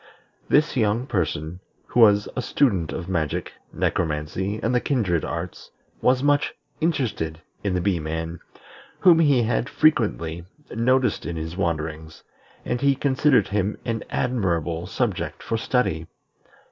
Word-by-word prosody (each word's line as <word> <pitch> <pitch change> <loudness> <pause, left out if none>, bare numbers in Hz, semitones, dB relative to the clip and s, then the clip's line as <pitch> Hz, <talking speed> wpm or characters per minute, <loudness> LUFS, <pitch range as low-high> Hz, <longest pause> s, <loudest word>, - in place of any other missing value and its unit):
This 150 +1 +3
young 115 0 +1
person, 85 - -2 0.3
who - - 0
was 105 -3 +6
a 125 - -1
student 100 - +1
of 85 - -5
magic, 85 -6 -2 0.2
necromancy, 85 +6 -1
and 115 - +1
the 125 - +2
kindred 95 - 0
arts, 85 +1 -5 0.3
was 130 +1 +3
much 145 0 +2 0.2
interested 120 - -1 0.2
in 100 -3 0
the 90 - 0
Bee 95 -2 +1
man, 80 +2 -4 0.6
whom 175 -3 +7
he 140 -6 +4
had 120 +3 0
frequently 100 - +1 0.3
noticed 125 +2 +2
in 85 - -4
his 80 +1 -5
wanderings, 80 -3 -3 0.4
and 120 0 -2
he 140 -1 +4
considered 135 -3 +3
him 100 0 0
an 115 -2 -2
admirable 85 -8 -1
subject 105 -1 -2
for 115 - -2
study. 110 -9 0
100 Hz, 135 wpm, -24 LUFS, 85-125 Hz, 0.6 s, whom